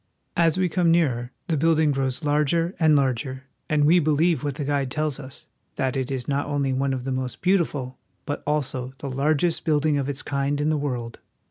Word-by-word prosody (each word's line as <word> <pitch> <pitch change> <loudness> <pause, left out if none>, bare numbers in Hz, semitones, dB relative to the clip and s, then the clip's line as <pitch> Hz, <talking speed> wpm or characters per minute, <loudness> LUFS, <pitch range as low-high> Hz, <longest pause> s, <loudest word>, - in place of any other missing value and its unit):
As 165 -1 +3
we 185 -1 +2
come 175 0 +1
nearer 130 -8 +2 0.2
the 165 - +1
building 160 0 +3
grows 135 +1 -1
larger 150 +4 +1
and 155 -2 +5
larger, 130 -1 0 0.3
and 150 -1 +3
we 170 +4 +6
believe 155 -1 +2
what 145 -2 -2
the 145 -1 -4
guide 140 -2 0
tells 150 0 -1
us, 130 -1 -9 0.3
that 130 -2 -1
it 130 -2 -2
is 130 -2 -3
not 145 0 -1
only 140 -2 0
one 135 +1 0
of 130 -2 -3
the 135 - -3
most 130 -1 -3
beautiful, 150 -9 0 0.3
but 145 - -3
also 135 -4 -1
the 140 - -5
largest 150 +5 +1
building 150 -2 +2
of 135 0 -2
its 140 0 -4
kind 140 +1 -1
in 150 +1 +1
the - - +1
world. 125 -5 -4
145 Hz, 205 wpm, -24 LUFS, 130-155 Hz, 0.3 s, we